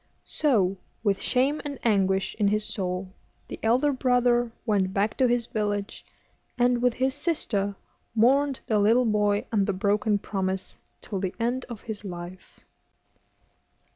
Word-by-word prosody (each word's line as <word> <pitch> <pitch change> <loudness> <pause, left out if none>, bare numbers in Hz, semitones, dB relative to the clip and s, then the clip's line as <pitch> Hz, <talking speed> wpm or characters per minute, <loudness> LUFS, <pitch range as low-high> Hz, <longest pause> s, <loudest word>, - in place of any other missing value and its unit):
So, 200 -11 +1 0.3
with 200 -3 +1
shame 270 +4 +1
and 285 -2 -5
anguish 195 -3 +2
in 205 - +3
his 210 +1 +1
soul, 185 -2 -3 0.3
the - - -7
elder 255 +6 +3
brother 245 -2 +2
went 195 -4 +1
back 205 +2 +1
to 260 - +4
his 240 -1 +1
village, 205 -2 -3 0.5
and, 245 0 +3
with 245 -1 +2
his 260 +1 +1
sister, 220 - -1 0.4
mourned 270 +4 +3
the 215 -4 +1
little 230 +5 +4
boy 210 -2 +1
and 205 -3 +2
the 200 - +1
broken 205 +2 +1
promise 190 -2 -3 0.2
till 195 - -4
the 185 -1 -3
end 245 +3 -1
of 235 -3 -7
his 215 -2 -6
life. 180 -1 -9
215 Hz, 145 wpm, -26 LUFS, 200-245 Hz, 0.5 s, to